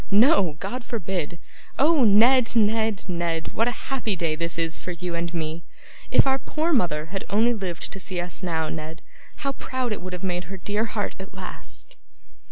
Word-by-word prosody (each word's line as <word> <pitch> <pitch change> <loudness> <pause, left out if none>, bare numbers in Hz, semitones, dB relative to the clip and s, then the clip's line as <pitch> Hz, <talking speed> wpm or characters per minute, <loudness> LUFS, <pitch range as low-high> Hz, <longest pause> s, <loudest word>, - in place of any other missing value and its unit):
No, 205 - +5
God 250 0 -4
forbid! 180 -8 -3 0.4
Oh, 300 0 +5
Ned, 230 +3 +6
Ned, 220 -1 +2
Ned, 170 -2 -2
what 230 - +2
a - - +2 0.2
happy 230 -6 0
day 165 -3 0
this 170 +1 -2
is 165 -1 -1
for 180 - -5
you 175 +1 -4
and 170 0 -2
me! 165 -1 -3 0.5
If - - +6
our 270 0 +3
poor 320 +4 0
mother 170 - +2
had 195 - -2
only 225 +4 +4
lived 185 -7 -4
to 195 - -7
see 185 -1 -4
us 175 +1 -5
now, 165 -3 0
Ned, 160 +2 -6 0.4
how 275 - +2
proud 260 -2 -3
it 210 - -2
would 185 0 -6
have 180 - -6
made 180 -2 -1
her 195 +3 -7
dear 205 +4 0
heart 215 -2 -2
at 190 0 -9
last! 190 - -8
190 Hz, 190 wpm, -25 LUFS, 170-230 Hz, 0.5 s, Ned